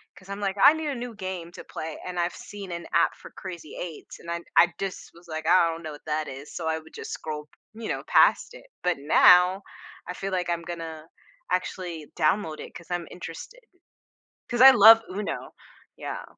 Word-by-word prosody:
'cause 185 Hz, -, -17 dB
I'm 200 Hz, +1 st, -5 dB
like, 200 Hz, 0 st, -1 dB
"I 295 Hz, -, +9 dB
need 315 Hz, -1 st, -4 dB
a 275 Hz, -, -2 dB
new 240 Hz, -1 st, -6 dB
game 185 Hz, -4 st, -6 dB
to -, -, -10 dB
play" 155 Hz, -1 st, -7 dB
and 180 Hz, -1 st, -4 dB
I've 175 Hz, +1 st, -1 dB
seen 200 Hz, -3 st, -9 dB
an 170 Hz, 0 st, -5 dB
app 170 Hz, -, +3 dB
for -, -, -13 dB
Crazy 175 Hz, -5 st, -9 dB
Eights 170 Hz, -4 st, -8 dB
and 170 Hz, -, -11 dB
I 170 Hz, 0 st, -3 dB, 0.2 s
I 175 Hz, +1 st, +6 dB
just 195 Hz, -1 st, -5 dB
was 170 Hz, +1 st, -18 dB
like, 160 Hz, 0 st, -5 dB
"I 170 Hz, -2 st, +5 dB
don't 165 Hz, 0 st, -5 dB
know 155 Hz, -, -5 dB
what 145 Hz, -, -14 dB
that 155 Hz, 0 st, -2 dB
is," 135 Hz, +3 st, -9 dB
so 165 Hz, -, -4 dB
I 160 Hz, 0 st, 0 dB
would 160 Hz, 0 st, -17 dB
just -, -, -8 dB
scroll, 150 Hz, -1 st, -5 dB, 0.3 s
you 220 Hz, 0 st, -7 dB
know, -, -, -3 dB
past -, -, +4 dB
it. -, -, -13 dB, 0.2 s
But 180 Hz, -3 st, +1 dB
now, 180 Hz, +6 st, +6 dB, 0.4 s
I 180 Hz, -, -4 dB
feel 195 Hz, +2 st, -5 dB
like 180 Hz, -1 st, -1 dB
I'm 170 Hz, -1 st, -1 dB
gonna 165 Hz, -2 st, -7 dB, 0.4 s
actually 175 Hz, -4 st, -3 dB
download 155 Hz, 0 st, +1 dB
it -, -, -10 dB
'cause 170 Hz, 0 st, -11 dB
I'm 175 Hz, -1 st, -2 dB
interested 180 Hz, -, -9 dB, 0.9 s
'cause 240 Hz, -1 st, 0 dB
I 265 Hz, +1 st, +12 dB
love 225 Hz, -1 st, +9 dB
UNO, 200 Hz, +2 st, -5 dB, 0.4 s
yeah. -, -, -6 dB
175 Hz, 210 wpm, -26 LUFS, 160-195 Hz, 0.9 s, I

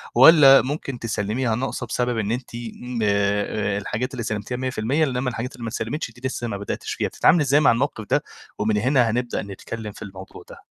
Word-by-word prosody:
والّا 135 Hz, 0 st, +8 dB
ممكن 135 Hz, -2 st, -4 dB
تسلّميها 110 Hz, +2 st, -1 dB
ناقصة 130 Hz, 0 st, -3 dB
بسبب 120 Hz, +1 st, -1 dB
إن 110 Hz, 0 st, -1 dB
أنت 120 Hz, -1 st, -4 dB
آمم، 120 Hz, +1 st, -6 dB
آآ، 100 Hz, 0 st, 0 dB
الحاجات 115 Hz, +5 st, -3 dB
اللي 120 Hz, -, -4 dB
سلّمتيها 110 Hz, +3 st, -3 dB
100% 130 Hz, +3 st, 0 dB
إنما 125 Hz, -2 st, 0 dB
الحاجات 125 Hz, 0 st, -5 dB
اللي 120 Hz, -, -10 dB
ما 115 Hz, -, -3 dB
اتسلّمِتش 115 Hz, +5 st, -4 dB
دي 120 Hz, +2 st, -18 dB
لسه 120 Hz, -2 st, -4 dB
ما 100 Hz, -3 st, -3 dB
بدأتيش 100 Hz, -, -4 dB
فيها، -, -, -1 dB
بتتعاملي 170 Hz, -, +3 dB
إزاي 140 Hz, +2 st, +4 dB
مع 145 Hz, -, +5 dB
الموقف 115 Hz, -3 st, -1 dB
ده؟ -, -, +3 dB, 0.4 s
ومن 105 Hz, 0 st, +1 dB
هنا 125 Hz, +1 st, +3 dB
هنبدأ 120 Hz, +2 st, -1 dB
نتكلم 105 Hz, +2 st, -7 dB
في -, -, -15 dB
الموضوع 95 Hz, -2 st, -10 dB
ده. -, -, -11 dB
120 Hz, 195 wpm, -23 LUFS, 105-130 Hz, 0.4 s, والّا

